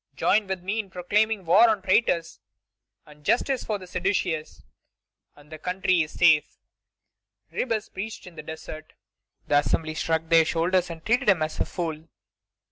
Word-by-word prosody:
Join 210 -1 +2
with 190 -2 -4
me 205 +4 -2
in 205 -3 -4
proclaiming 205 +3 0
war 215 +8 +6
on 210 -3 0
traitors 175 -4 +1 0.7
and 150 0 -17
justice 255 - +1
for 215 - -2
the 185 - -11
seditious, 180 -3 -2 0.7
and 145 +1 -19
the 155 - -8
country 185 0 +1
is 155 - -5
safe!" 160 -4 +4 0.9
Ribes 220 -3 -2
preached 215 +3 -7
in 180 -2 -12
the 155 - -7
desert. 155 0 -9 0.5
The 145 - +4
Assembly 155 +2 -1
shrugged 160 +1 -2
their 165 -1 +7
shoulders 175 +2 +1
and 165 -1 -9
treated 240 +1 +2
him 175 -5 +4
as 155 - -4
a - - +1
fool. 160 -3 -5
180 Hz, 160 wpm, -25 LUFS, 160-205 Hz, 0.9 s, their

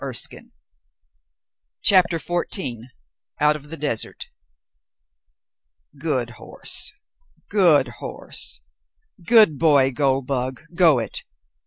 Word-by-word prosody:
BOOK - - -6
TWO - - -2 1.4
CHAPTER 180 -3 +4
XIV 165 - -3 0.5
OUT 150 0 +3
OF 150 -1 -11
THE 165 - -6
DESERT 140 -6 -3 1.7
"Good 130 -6 -1
horse. - - -2 0.6
Good 170 -10 +4
horse. - - -5 0.6
Good 210 - +6
boy. 140 -5 +4
Goldbug 130 -1 -1
go 165 -5 +4
it! 115 - -4
150 Hz, 85 wpm, -22 LUFS, 130-170 Hz, 1.7 s, Good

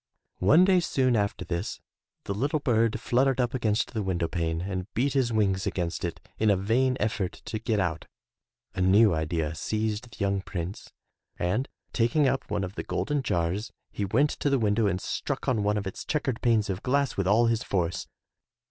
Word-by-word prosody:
One 150 - +6
day 185 -1 +5
soon 130 -7 +1
after 100 -2 -1
this, 85 +3 -3 0.4
the 100 - -3
little 140 +9 0
bird 115 -5 +1
fluttered 130 +1 +2
up 120 -1 +1
against 110 -3 0
the 110 - -1
window 90 -4 -1
pane 80 -1 -2
and 95 +1 -4
beat 135 +4 +1
his 130 -4 +2
wings 100 -3 +1
against 85 -2 -2
it 85 -2 -3 0.2
in 110 - +3
a 100 - +5
vain 125 +7 +1
effort 105 -3 -1
to 110 - -3
get 110 -1 0
out. 85 -4 -2 0.7
A 95 - -3
new 100 +2 +5
idea 80 0 -1
seized 110 +7 -2
the 105 - -14
young 100 -1 +1
Prince, 90 0 -6 0.5
and 100 +10 -1 0.2
taking 130 +5 +3
up 135 - -1
one 105 -2 -1
of 95 0 -5
the - - -5
golden 145 -1 -1
jars 90 +1 -1 0.2
he 105 - -3
went 135 +10 +2
to 145 - -1
the 140 - +3
window 110 -1 +2
and 95 -2 0
struck - - -3
on 115 -5 +2
one 105 +1 +1
of 100 - -3
its 95 - -5
checkered 135 -6 -2
panes 115 -3 +3
of 95 0 -3
glass 140 +1 +1
with 95 -2 -1
all 110 +4 +4
his 115 -1 +1
force. 90 -3 -1
105 Hz, 195 wpm, -27 LUFS, 95-125 Hz, 0.7 s, One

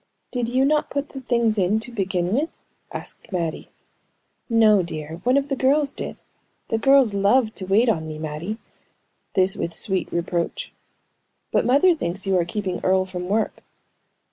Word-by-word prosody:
"Did 245 -2 -1
you 260 +2 +2
not 300 +1 +2
put 285 +1 -3
the 270 - -8
things 235 -4 +1
in, 195 +4 +2
to 245 - -6
begin 190 -4 -1
with?" 295 +7 +1 0.4
asked - - -8
Mattie. 170 -4 -3 0.8
"No, 220 -3 +5
dear; 160 -2 -5
one 250 +3 +3
of 280 0 +1
the 275 - -1
girls 275 +2 +2
did. - - -7 0.5
The 225 - 0
girls 270 -3 +5
loved 215 +4 +3
to 190 - -3
wait 215 +6 +4
on 160 -8 +1
me, 155 -1 -6
Mattie!" 155 +7 -4 0.8
This 190 +1 +3
with 170 - -3
sweet 190 -2 0
reproach. 170 - -2 0.8
"But - - +2
mother 285 +9 +5
thinks 195 - -3
you 195 -1 +2
are 170 - +1
keeping 185 0 -3
Earle 185 0 +3
from 180 -1 -5
work." 215 +2 -1
210 Hz, 170 wpm, -23 LUFS, 180-255 Hz, 0.8 s, No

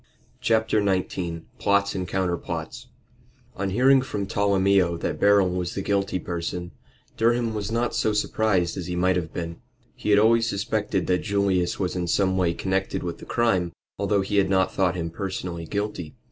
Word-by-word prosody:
CHAPTER 110 -2 +2
XIX 90 -3 -1 0.2
PLOTS 100 0 +2
AND 95 -2 -3
COUNTERPLOTS 90 -2 -3 0.7
On 100 0 -2
hearing 130 +6 +5
from 105 -6 -3
Tolomeo 100 -3 +2
that - - -3
Beryl 100 -2 +5
was 90 -1 -3
the 95 - -2
guilty 100 -2 0
person, 85 0 -4 0.5
Durham 115 0 +2
was 105 0 -3
not 120 +1 0
so 110 - +1
surprised 105 -4 +1
as 90 - -5
he 90 - -3
might 90 +1 +2
have 85 -3 -2
been. 85 -1 -5 0.4
He - - -5
had 100 - +6
always 115 +2 +4
suspected 100 -2 -1
that 90 0 +2
Julius 100 -4 0
was 95 -2 -1
in 90 -1 -2
some 95 +1 +2
way 90 -3 +1
connected 95 0 -1
with 85 -1 -4
the - - -10
crime, 95 -8 +1 0.3
although 100 -2 +2
he 100 +1 -1
had 95 -1 +3
not 95 -1 +2
thought 95 -2 +1
him 85 -2 -3
personally 90 -3 -5
guilty. 100 -6 -4
95 Hz, 175 wpm, -25 LUFS, 90-105 Hz, 0.7 s, had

